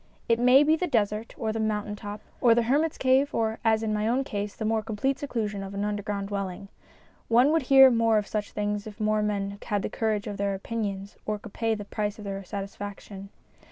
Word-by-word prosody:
It 230 0 +3
may 250 +3 +6
be 310 +2 +4
the 360 +3 -2
desert 215 -4 -1
or 220 -2 -2
the 225 - -3
mountain 210 -1 -1
top, 205 0 -7 0.2
or 235 -2 +6
the 235 - +3
hermit's 295 +7 +1
cave 265 +2 +2
or, 220 -1 0
as 220 -1 +3
in 215 -1 0
my 210 +1 0
own 250 +4 +1
case, 205 -4 -4
the 220 - -4
more 220 0 +1
complete 225 +6 -1
seclusion 215 -7 -3
of 195 0 -7
an 200 +1 -1
underground 205 -1 -3
dwelling. 195 -1 -4 0.6
One 245 +5 +5
would 325 0 +3
hear 270 -1 +9
more 230 -2 +3
of 210 - 0
such 210 0 -3
things 205 0 -2
if 215 +1 -10
more 215 0 +1
men 200 -1 -2
had 205 -3 -2
the - - -2
courage 215 -2 -1
of 205 -2 -5
their 200 0 0
opinions 200 -1 -4
or 210 0 0
could 210 0 -12
pay 225 -1 0
the 205 -1 -7
price 210 0 -3
of 210 - -9
their 195 0 -4
satisfaction. 200 0 -7
215 Hz, 225 wpm, -27 LUFS, 205-230 Hz, 0.6 s, hear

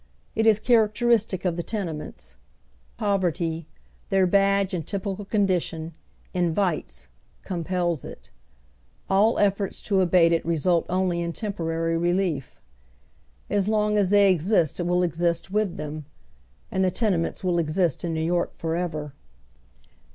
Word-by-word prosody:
It 225 0 +1
is 215 -1 +5
characteristic 220 -3 +2
of 175 -2 0
the - - -1
tene 190 -4 -3
ments. 150 - -10 0.6
Poverty, 170 -5 -1 0.4
their 195 -1 +3
badge 195 +1 +2
and 170 -3 -2
typical 200 0 -3
condition, 180 -5 -1 0.4
in 175 -3 0
vites 185 -6 -2 0.2
— - - -37
compels 175 -3 -1
it. - - -11 0.8
All 205 +4 +4
efforts 200 -1 0
to 195 -2 +2
abate 175 -2 +4
it 165 - +1
result 170 +1 +1
only 180 -1 0
in 170 0 -3
temporary 165 -5 -2
relief. 175 -5 -1 0.9
As 205 -1 0
long 210 -1 +1
as 200 -3 +2
they 200 -1 +5
exist 175 -2 +1
it 175 - -1
will 180 0 +2
exist 170 +1 -1
with 210 -3 0
them. 150 0 -6 0.7
And 190 -3 +1
tlie 185 -1 0
tenements 195 -9 0
will 175 -2 +1
exist 165 0 0
in 165 -2 -2
Kew 160 - -1
York 175 +1 0
for 165 0 -2
ever. 155 -5 -3
180 Hz, 145 wpm, -25 LUFS, 165-200 Hz, 0.9 s, is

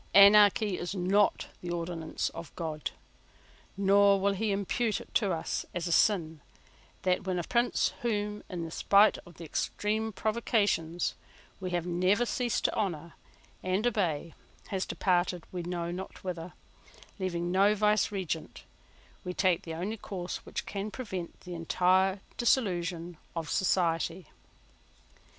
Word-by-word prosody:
Anarchy 205 0 +7
is 175 +3 -4
not 195 +2 +2 0.2
the 175 - -6
ordinance 170 -2 -3
of 165 - -9
God; 155 -3 -3 0.9
nor 200 0 +5
will 200 +1 +2
he 210 +2 -1
impute 205 +3 0
it - - -13
to 205 -4 +2
us 165 -2 -2
as 175 -1 -2
a 170 - -2
sin 165 -4 +2 0.6
that, 185 +1 +1
when 185 -1 0
a 175 - -1
prince, 240 +6 +1
whom, 210 -3 -1
in 170 -3 -4
spite 200 +5 +4
of 170 - -15
extreme 210 +6 -1
provocations, 205 -6 0 0.5
we 185 -2 -4
have 175 -1 -1
never 185 +6 +2
ceased 240 -1 -1
to - - +3
honour 170 -5 -2 0.5
and 185 +4 0
obey, 170 -9 0 0.4
has 190 -1 -2
departed 180 -2 +1
we 180 - -3
know 170 0 -3
not 185 +2 -7
whither, 175 -2 -5 0.7
leaving 175 -2 -2
no 200 +3 +4
vicegerent, 200 -5 0 0.6
we 180 0 -5
take 185 -3 +2
the 165 -1 -6
only 195 +7 -3
course 185 -4 -5
which - - -4
can 200 +1 -4
prevent 190 -8 -6
the 180 - -8
entire 185 +3 +2 0.2
dissolution 175 -8 0 0.2
of 165 -3 -3
society. 170 -1 +1
185 Hz, 135 wpm, -30 LUFS, 170-205 Hz, 0.9 s, Anarchy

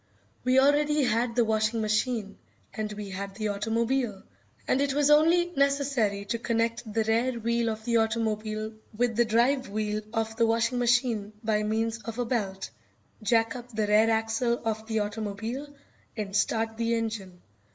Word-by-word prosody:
We 255 +1 +3
already 290 +2 +4
had 230 -1 +1
the 240 -2 +3
washing 220 +1 +1
machine, 215 -1 -1 0.3
and 215 -1 -3
we 205 -1 -7
had 195 +1 -5
the 215 0 -2
automobile, 225 +1 -1 0.4
and 270 - +2
it 280 -1 0
was 295 0 +3
only 335 +4 +5
necessary 275 -8 +1
to 230 +3 -2
connect 230 -1 -1
the 225 +1 +1
rear 230 +4 +1
wheel 235 0 0
of 220 0 -5
the 235 -1 +2
automobile 220 -1 -1 0.2
with 240 -1 +1
the 240 +1 +3
drive 245 +4 +2
wheel 210 0 -2
of 225 -1 -2
the 230 -1 +3
washing 230 +2 +1
machine 240 -4 +1
by 215 -1 +1
means 225 +2 -1
of 230 +1 -7
a 245 - 0
belt, 200 -6 -2 0.5
jack 225 +2 +2
up 245 0 -8
the 215 -1 +1
rear 210 +2 +4
axle 225 +2 +1
of 220 0 -2
the 220 -1 -1
automobile, 220 +6 -4 0.5
and 200 -2 -4
start 225 +1 0
the 230 0 +1
engine. 215 -6 -4
225 Hz, 165 wpm, -27 LUFS, 215-245 Hz, 0.5 s, only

